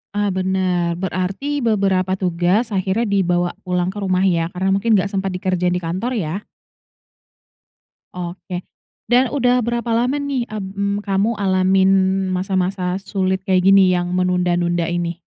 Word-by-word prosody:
Ah 205 -1 +1
bener 185 -2 0
berarti 190 +10 -2
beberapa 195 -5 +1
tugas 185 +5 0
akhirnya 195 +4 0
dibawa 175 -3 +1 0.2
pulang 180 0 0
ke 205 - -11
rumah 185 -1 +1
ya 170 -3 +2
karena 190 +2 0
mungkin 210 +3 +2
gak 195 +1 +1
sempat 195 -1 -2
dikerjain 180 -1 0
di 180 - -3
kantor 185 +10 -2
ya? 185 +1 -3 1.7
Oke 180 0 -6 0.4
dan 245 +1 +3
udah 250 -3 +2
berapa 235 0 -2
lama 250 +5 +1
nih, 280 -4 -1
mmm, 200 0 -3
kamu 200 +2 0
alamin 190 0 +3 0.4
masa-masa 185 0 -1
sulit 190 -1 -1
kayak 185 -1 +3
gini 195 -1 +6
yang 175 -1 0
menunda-nunda 180 -1 +1
ini? 175 0 -3
190 Hz, 135 wpm, -20 LUFS, 180-200 Hz, 1.7 s, gini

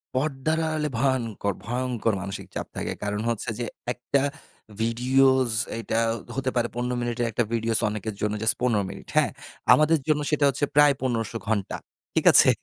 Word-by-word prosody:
পর্দার 150 +3 0
আড়ালে 155 -1 -1
ভয়ংকর 115 -7 0
ভয়ংকর 120 -2 -1
মানসিক 100 0 -6
চাপ - - -3
থাকে। - - -3
কারণ 105 +1 -2
হচ্ছে 115 0 -2
যে 120 - -1 0.3
একটা 130 +2 0 0.6
ভিডিওস, 130 +2 +3 0.3
এটা 115 0 -1 0.4
হতে 135 -1 -1
পারে 120 0 +2
১৫ 125 +1 -1
মিনিটের 120 0 -1
একটা 120 - +1
videos 115 -1 +1
অনেকের 105 0 -4
জন্য 105 0 0
জাস্ট 110 0 +3
১৫ 115 -5 +2
মিনিট, - - -10
হ্যা। - - +5 0.5
আমাদের 155 +1 +4
জন্য 150 -1 +2
সেটা 150 -1 +3
হচ্ছে 140 +2 0
প্রায় 145 -1 +7
১৫০০ 115 -3 -1
ঘণ্টা, 105 -4 -1 0.4
ঠিক - - +1
আছে? - - +7
120 Hz, 160 wpm, -25 LUFS, 110-135 Hz, 0.6 s, প্রায়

